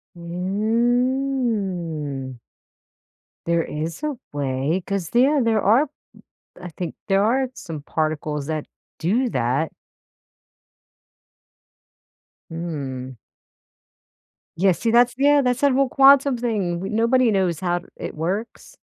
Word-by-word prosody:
Mm. 195 - -1 1.1
There 170 -1 +2
is 160 - -5
a 295 -3 -2 0.2
way, 140 +5 -1
'cause 195 -4 -3
yeah, 275 +5 +4
there 220 -2 +2
are 230 +9 +4
b 290 - -20 0.7
I 180 - -7
think 175 +1 -6
there 195 0 +3
are 255 +4 +1
some 160 -9 -7
particles 155 -2 -2
that 155 -1 -3 0.3
do 230 +10 +1
that. 130 - 0 2.8
Mm. 140 -6 -5 1.4
Yes, 185 0 +2
see, 230 - +1
that's 240 +1 +5
Yeah, 285 +1 +5
that's 250 0 0
what 285 -1 +4
a 275 -1 +3
quantum 275 -1 +5
thing 205 -8 -1
we 190 - -4
nobody 230 +2 +3
knows 185 -5 +1
how 175 -1 -1
it - - -7
works. 190 +8 -4
195 Hz, 110 wpm, -22 LUFS, 160-245 Hz, 2.8 s, that's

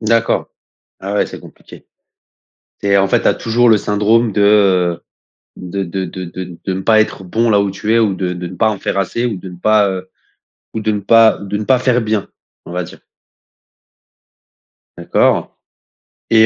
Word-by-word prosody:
D'accord. 115 +1 +1 0.5
Ah 100 +1 -4
ouais, 105 - +1
c'est - - -10
compliqué. - - -15 0.9
C'est, 100 0 +2
en 95 0 +3
fait, - - +1
tu - - +3
as - - +2
toujours 120 +1 +1
le 110 - +6
syndrome 105 +2 +1
de, 100 - +1
heu 95 -4 +3 0.6
de 95 +2 -5
de 95 +2 -4
de 90 +2 -7
de 90 +1 -6
ne 95 - -3
pas 110 +2 +4
être 105 -3 -2
bon 115 +6 0
là 105 -1 +4
où 100 -1 0
tu 105 +3 -2
es - - +4
ou 105 -4 +2
de 90 -1 -3
de 90 0 -6
ne 90 - -8
pas 110 -1 +2
en 105 - -4
faire 100 - -2
assez 115 +6 -1
ou 110 -5 -3
de 95 +1 -9
ne 90 - -11
pas, 105 +2 +3
heu 95 0 -6 0.7
ou 110 - -2
de 110 0 0
ne 105 - -2
pas 115 +2 +5
de 100 0 -5
ne 105 - -3
pas 130 +3 +3
faire 125 -1 +1
bien, 110 -3 -2 0.4
on - - -10
va 90 0 -2
dire. - - -13 2.0
D'accord. - - +1 0.8
Et 110 -1 +6
100 Hz, 195 wpm, -16 LUFS, 95-110 Hz, 2.0 s, le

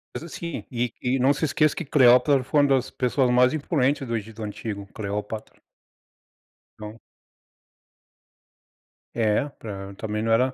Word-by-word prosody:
Mas - - -5
assim, 170 0 -6
e 120 0 -2
e 125 +1 +1
não 135 +3 +4
se 150 - -5
esqueça 155 0 +2
que 170 - -4
Cleópatra 135 0 +5
foi 145 +3 +2
uma 145 - +3
das 130 -2 +2
pessoas 125 0 0
mais 125 +1 +4
imponentes 140 -3 0
do 115 - -2
Egito 110 0 -6
antigo. 105 -1 -6
Cleópatra. 105 +1 -5 1.2
Não. 105 +2 -9 2.2
É, 115 +5 +1
pra 100 -7 -8
também 105 +1 -3
não 115 0 +1
era 125 +3 +2
125 Hz, 140 wpm, -24 LUFS, 110-140 Hz, 2.2 s, Cleópatra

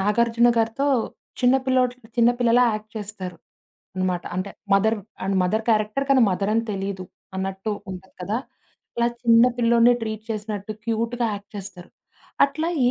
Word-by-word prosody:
'నాగార్జున' 235 +4 +3
గారితో 225 +5 0 0.5
చిన్న 250 +1 +5
పిల్లోడు 255 -1 +2 0.2
చిన్న 235 0 +6
పిల్లలా 245 +1 +5
యాక్ట్ 215 0 -7
చేస్తారు 195 -4 -6 0.6
అనమాట. 185 -1 0
అంటే 185 +2 -3 0.2
మదర్ 220 +3 +3 0.3
అండ్ 195 0 0
మదర్ 220 +5 0
క్యారెక్టర్ 215 +5 +1
కానీ 265 -2 +6
మదర్ 195 +2 -1
అని 230 - +2
తెలీదు 195 -1 -4 0.3
అన్నట్టు 190 +2 -3 0.2
ఉంటది 190 0 -10
కదా! 210 +5 -1 0.6
ఇలా 235 - +3 0.2
చిన్న 230 -1 +6
పిల్లోడినే 235 0 +5
ట్రీట్ 220 -1 -4
చేసినట్టు 210 -1 -4
క్యూట్‌గా 230 +1 0
యాక్ట్ 200 0 -10
చేస్తారు. 185 -3 -9 0.5
అట్లా 310 +4 -2 0.2
ఏ - - +3
220 Hz, 145 wpm, -23 LUFS, 195-235 Hz, 0.6 s, చిన్న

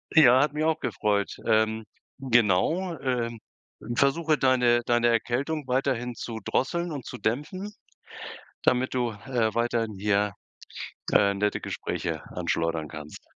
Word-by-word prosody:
.Ja, 130 -5 +8
hat 145 0 +1
mich 150 +1 -1
auch 160 0 +1
gefreut. 100 -2 0 0.2
Ähm, 110 0 +2 0.3
genau. 130 - +2
Äh, 125 -3 -1 0.7
versuche 155 +2 +3
deine 125 -2 +3
deine 120 0 +3
Erkältung 130 +6 0
weiterhin 125 -2 0
zu 115 -1 -6
drosseln 170 +5 0
und 140 -5 -6
zu 125 - -7
dämpfen, 165 - -3 0.9
damit 130 +1 +2
du, 120 -2 +1
äh, 110 +1 -1
weiterhin 115 -3 0
hier, 105 0 +1 0.8
äh, 100 -1 +4
nette 105 +1 0
Gespräche - - -4
anschleudern 80 -2 -1
kannst. 75 -1 -10
120 Hz, 125 wpm, -27 LUFS, 110-140 Hz, 0.9 s, Ja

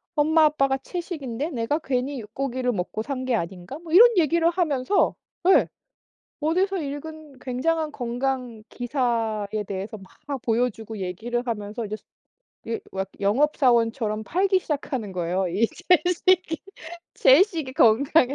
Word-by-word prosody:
엄마 310 +1 +4
아빠가 275 -3 +2
채식인데 305 -4 -5
내가 245 +4 -1
괜히 265 -1 -2
육고기를 250 +3 -2
먹고 200 +3 -3
산 260 -1 -4
게 255 -2 +1
아닌가?" 180 - -5
뭐 335 -1 -9
이런 470 +6 +9
얘기를 335 +1 +3
하면서 335 -1 +1 0.4
예 - - +6 0.8
어디서 375 +5 +1
읽은 300 -1 -7
굉장한 300 +5 -1
건강 245 -2 -3
기사에 225 -5 -1
대해서 200 +2 -5 0.3
막 275 -4 -4
보여주고 225 -2 -1
얘기를 225 +7 -3
하면서 215 0 -4
이제 210 +1 -4 0.7
예 230 - -2
왁 190 0 -3
영업사원처럼 230 -2 +2
팔기 380 - +2
시작하는 265 - -3
거예요. 180 +1 -1
이 205 +7 +2
채식이, 360 0 +2 0.5
채식이 310 -3 +4
건강에 265 +4 +4
260 Hz, 295 characters per minute, -24 LUFS, 225-310 Hz, 0.8 s, 이런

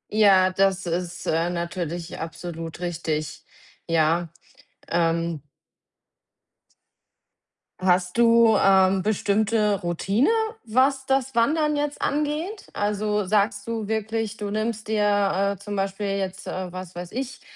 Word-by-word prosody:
Ja, 190 -3 +5
das 195 0 +1
ist, 175 +1 -3
äh, 165 +2 +1
natürlich 170 -1 -4
absolut 165 0 -6
richtig. 160 -3 -3 0.4
Ja, 165 +1 +2 0.6
ähm 165 -2 0 2.4
Hast 180 +1 +1
du, 230 -1 +6
äh, 190 -1 +4
bestimmte 210 0 +1
Routine, 195 - +1 0.3
was 265 +4 +2
das 270 -1 +1
Wandern 300 +6 +2
jetzt 290 0 -2
angeht? 300 +8 -2
Also 210 0 -1
sagst 200 +1 +1
du 225 -2 -3
wirklich, 220 0 -2
du 205 -2 -4
nimmst 215 0 -2
dir, 205 -2 +1
äh, - - -27
zum 205 0 -6
Beispiel 195 +1 -2
jetzt, 190 -1 -4
äh, 185 -1 -4
was 185 -1 -8
weiß 175 0 -7
ich, 255 0 -5
200 Hz, 115 wpm, -24 LUFS, 175-220 Hz, 2.4 s, du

